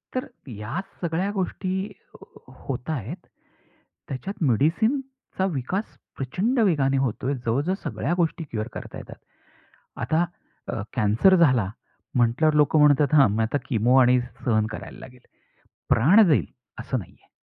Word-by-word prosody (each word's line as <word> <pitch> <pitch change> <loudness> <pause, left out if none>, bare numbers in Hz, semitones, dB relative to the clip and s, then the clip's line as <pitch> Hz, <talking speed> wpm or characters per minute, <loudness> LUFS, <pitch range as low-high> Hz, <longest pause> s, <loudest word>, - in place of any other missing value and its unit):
तर 255 - -1 0.2
ह्या 105 - -5 0.2
सगळ्या 175 +3 -1
गोष्टी 190 0 -3 0.2
होत 130 +1 -9
आहेत. 155 - -5 0.8
त्याच्यात 175 +8 -5
मेडिसिनचा 220 - 0
विकास 165 - -3 0.2
प्रचंड 195 - -1
वेगाने 145 -10 +2
होतोय. 135 +1 -1
जवळ-जवळ 140 +11 0
सगळ्या - - -2
गोष्टी 165 -1 0
क्युअर 110 -8 -4
करता - - -8
येतात. - - -10 0.8
आता 165 +2 +1 0.4
अ, 110 - -3
कॅन्सर 110 - +4
झाला, 130 - +3 0.5
म्हटल्यावर 125 +6 +3
लोकं 150 +1 +4
म्हणतात, 145 -1 +4
"हं, 135 -8 +6
मी 110 - +1
आता 110 +6 0
किमो 120 0 +2
आणि 125 0 +5 0.2
सहन 110 -3 +2
करायला - - -8
लागेल. 125 -1 -13 0.7
प्राण 175 - +6
जाईल 155 -5 +3 0.3
असं 130 +2 -2
नाही 95 - -11
आहे." - - -30
145 Hz, 130 wpm, -24 LUFS, 125-180 Hz, 0.8 s, हं